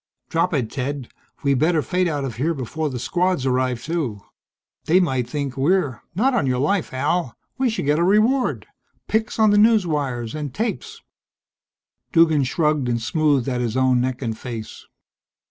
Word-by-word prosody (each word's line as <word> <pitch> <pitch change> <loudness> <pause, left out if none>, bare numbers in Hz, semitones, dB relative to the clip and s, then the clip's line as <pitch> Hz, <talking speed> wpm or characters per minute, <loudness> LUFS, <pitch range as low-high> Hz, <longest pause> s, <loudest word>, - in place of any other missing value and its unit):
"Drop 165 +2 +1
it, 130 -9 -1
Ted. 135 -1 -4 0.3
We 140 -1 +3
better 155 +3 +2
fade 180 -1 0
out 145 -4 -2
of 120 -4 -6
here 160 +6 0
before 150 +4 -3
the 130 - -5
Squads 175 +2 0
arrive, 130 -2 0
too. 150 -11 -2 0.7
They 175 +4 +4
might 130 -9 0
think 140 -2 -3
we're 145 -1 +1
" - - -44
"Not 260 +8 +2
on 230 - +1
your 125 -1 +1
life, 160 +8 0
Al. 145 +1 -1 0.2
We 260 -2 +2
should 220 -9 -3
get 150 +2 +2
a - - +3
reward. 215 +8 +2 0.4
Pics 220 0 -1
on 215 -2 +5
the 205 - +4
newswires 150 - +2
and 150 -3 -5
tapes." 440 - -4 1.1
Duggan 160 -4 +4
shrugged 150 -1 0
and 120 -1 0
smoothed 140 +1 +1
at 125 -2 -1
his 120 0 -2
own 130 -1 +3
neck 130 +1 -2
and 115 -2 -2
face. 115 -2 -8
145 Hz, 175 wpm, -22 LUFS, 130-180 Hz, 1.1 s, on